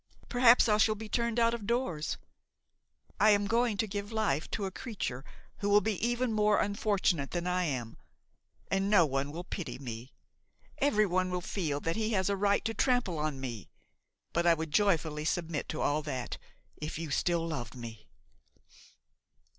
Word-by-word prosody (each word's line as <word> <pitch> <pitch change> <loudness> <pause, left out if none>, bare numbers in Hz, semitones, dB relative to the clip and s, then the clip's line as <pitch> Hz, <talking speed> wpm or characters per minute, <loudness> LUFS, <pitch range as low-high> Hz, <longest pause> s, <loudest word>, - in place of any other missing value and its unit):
perhaps 245 -1 +6
I 210 -1 +4
shall 215 0 +3
be 220 +1 -7
turned 235 +1 0
out 230 0 +4
of 220 -4 -5
doors. 200 -11 -1 1.0
I 215 - +6
am 205 -1 +4
going 230 0 +1
to 220 - +1
give 205 +1 -5
life 210 -9 0
to 205 - -2
a 190 - -3
creature 180 - -5 0.4
who 205 - -1
will 205 +1 +7
be 210 -2 -2
even 240 0 +1
more 210 -1 +3
unfortunate 200 -7 +1
than 175 -1 -3
I 180 0 +1
am, 125 -7 -3 0.7
and 195 0 +1
no 200 -5 +6
one 135 0 -2
will 170 +3 -6
pity 180 -2 -5
me. 120 -1 -7 0.7
Everyone 205 -9 +2
will 180 0 -1
feel 165 -5 -2
that 165 +4 -1
he 220 0 0
has 190 0 +1
a - - +1
right 200 +1 +1
to 225 - 0
trample 240 - +1
on 150 -3 -2
me. 120 -6 -6 0.6
But 170 +1 +2
I 170 - +6
would 160 -1 -5
joyfully 160 -5 +2
submit 165 -1 -2
to - - -3
all 150 +2 +1
that, 130 -5 -4 0.4
if 150 +1 -5
you 160 -2 -5
still 170 +2 +1
loved 120 -7 -5
me." 115 -3 -9
185 Hz, 175 wpm, -31 LUFS, 150-215 Hz, 1.0 s, will